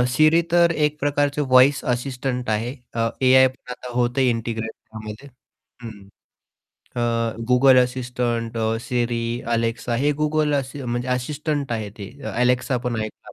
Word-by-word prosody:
Siri 155 +3 +5
तर 170 -1 +5
एक 150 -1 0
प्रकारचे 145 0 0
व्हॉईस 130 +1 +4
असिस्टंट 125 -1 -3
आहे 115 +5 -1 0.2
अ, 115 0 +1
एआय 130 0 +6
पण 130 -1 -11
आता 125 0 -8
होतं 125 +2 +1
इंटिग्रेट 115 -2 -1
त्यामध्ये 110 +4 -10 0.6
हं. 105 -4 -10 0.9
आह, 115 -1 0 0.2
Google 130 +1 +6
असिस्टंट, 120 -2 -3 0.3
Siri, 120 -1 0 0.3
Alexa 115 +1 -1
हे 150 - +3
Google 150 -1 +1 0.3
म्हणजे 120 +1 -2
असिस्टंट 140 +2 -2
आहे 110 -3 -3
ते 100 0 -7 0.3
Alexa 125 +1 +2
पण 120 -2 -1
ऐकला 110 0 -7
125 Hz, 130 wpm, -22 LUFS, 115-140 Hz, 0.9 s, एआय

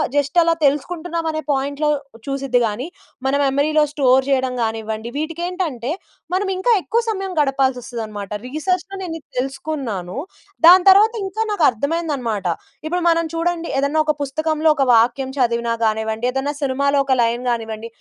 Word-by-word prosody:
Just 285 +3 0
అలా 335 0 +3
తెలుసుకుంటున్నాం 330 +4 -1
అనే 310 0 -3
పాయింట్‌లో 285 +2 0 0.4
చూసిద్ది‌ 275 -2 0
గాని, 225 +7 -4 0.4
మన 265 +1 +2
మెమరీ‌లో 290 +3 +2
స్టోర్ 265 -2 +4
చేయడం 260 -2 +1
కానివ్వండి 220 0 -3
వీటికెంటంటే, 325 - -3 0.4
మనం 385 +2 +1
ఇంకా 380 +6 +1
ఎక్కువ 460 +6 0
సమయం 390 -3 -3
గడపాల్సి 270 -3 +1
వస్తదనమాట. 215 -5 -6 0.2
రిసర్చ్‌లో 360 +8 -2
నేను 345 -3 -4
ఇది - - -29
తెలుసుకున్నాను. 265 - -4 0.5
దాని 360 +1 +9
తర్వాత 415 +4 +6
ఇంకా 385 +3 -3
నాకు 410 -6 0
అర్థమైంది 305 +7 -2
అనమాట. 225 -6 -3 0.4
ఇప్పుడు 350 +3 -1
మనం 335 0 +2
చూడండి 335 0 -1
ఏదైనా 280 +3 +1
ఒక 305 - +2
పుస్తకంలో 310 +3 0
ఒక 280 - +2
వాక్యం 240 +4 +2
చదివిన 235 -2 +1 0.2
కానివ్వండి, 220 +1 -1
ఏదైనా 270 +3 -2
సినిమాలో 280 +1 +1
ఒక 265 - +2
లైన్ 235 +1 0
కానివ్వండి. 225 -1 -3
280 Hz, 145 wpm, -20 LUFS, 245-330 Hz, 0.5 s, దాని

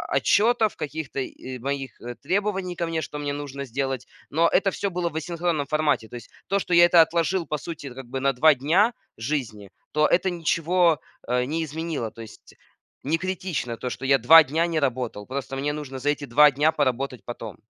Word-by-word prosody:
отчетов, 220 0 +3
каких-то 150 -2 -5
и 130 -1 -6
моих, 135 +1 -4
э, 120 0 -7
требований 190 - -2
ко 170 - -1
мне, 165 -1 -2
что 150 - -6
мне 145 -1 -2
нужно 140 -1 -6
сделать, 135 0 -3 0.2
но 165 +3 +3
это 195 +3 +2
всё 200 - -2
было 175 -2 -2
в 155 - -15
асинхронном 165 -2 -1
формате. 150 -6 +1
То 120 - -11
есть 120 - -10 0.2
то, 195 - +1
что 180 - -3
я 170 0 +8
это 175 -1 +7
отложил 170 +2 +1
по 150 - -2
сути 145 -4 -8
как 135 +1 -9
бы 130 +2 -5
на 140 0 +3
2 155 +4 +5
дня 175 - +2 0.2
жизни, 115 -6 -4 0.2
то 150 0 +3
это 190 +2 +2
ничего, 170 -1 +1 0.3
э, 125 +1 +1
не 160 +5 -2
изменило. 155 -6 -4
То 115 - -11
есть 110 -2 -13 0.5
не 155 +4 +1
критично 180 -9 -3
то, 125 - -4
что 135 - -6
я 135 0 +5
2 160 +7 +8
дня 160 +4 0
не 165 -2 0
работал. 125 -6 -2
Просто 135 0 -5
мне 140 +2 -1
нужно 140 -3 -6
за 145 +3 -1
эти 145 0 -1
2 145 +4 +6
дня 145 +4 +2
поработать 135 -3 -1
потом. 115 -6 -7
150 Hz, 205 wpm, -24 LUFS, 130-170 Hz, 0.5 s, я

